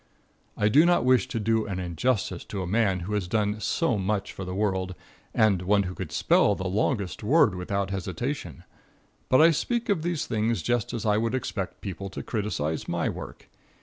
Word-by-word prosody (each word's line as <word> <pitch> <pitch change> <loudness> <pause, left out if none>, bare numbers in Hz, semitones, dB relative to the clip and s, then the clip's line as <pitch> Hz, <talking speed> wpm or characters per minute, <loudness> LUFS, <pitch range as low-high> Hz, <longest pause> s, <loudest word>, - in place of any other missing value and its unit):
I 105 - +2
do 140 +9 +6
not 175 -5 +3
wish 130 0 +4
to 115 - -3
do 110 0 +1
an 95 -2 -3
injustice 90 +2 -1
to 95 -2 -4
a - - -3
man 95 -1 +1
who 100 +5 -4
has 105 -4 -1
done 105 +1 0
so 120 - 0
much 100 +1 -1
for 95 - -6
the 90 0 -5
world, 95 -2 -1 0.4
and 105 -5 +3
one 100 +2 +3
who 90 -1 -5
could - - -6
spell 105 - +3
the 95 0 -4
longest 100 0 -1
word 115 - +4
without 100 +2 -2
hesitation, 95 - -4 0.7
but 130 - +5
I 165 +1 +7
speak 235 - -1
of 195 -6 +2
these 170 -1 -1
things 110 +1 0
just 120 -3 0
as 115 -2 -4
I 105 0 +3
would 115 +2 0
expect 100 -7 -4
people 100 0 -5
to - - -7
criticise 100 -8 -2
my - - 0
work. - - -8
105 Hz, 195 wpm, -26 LUFS, 95-120 Hz, 0.7 s, I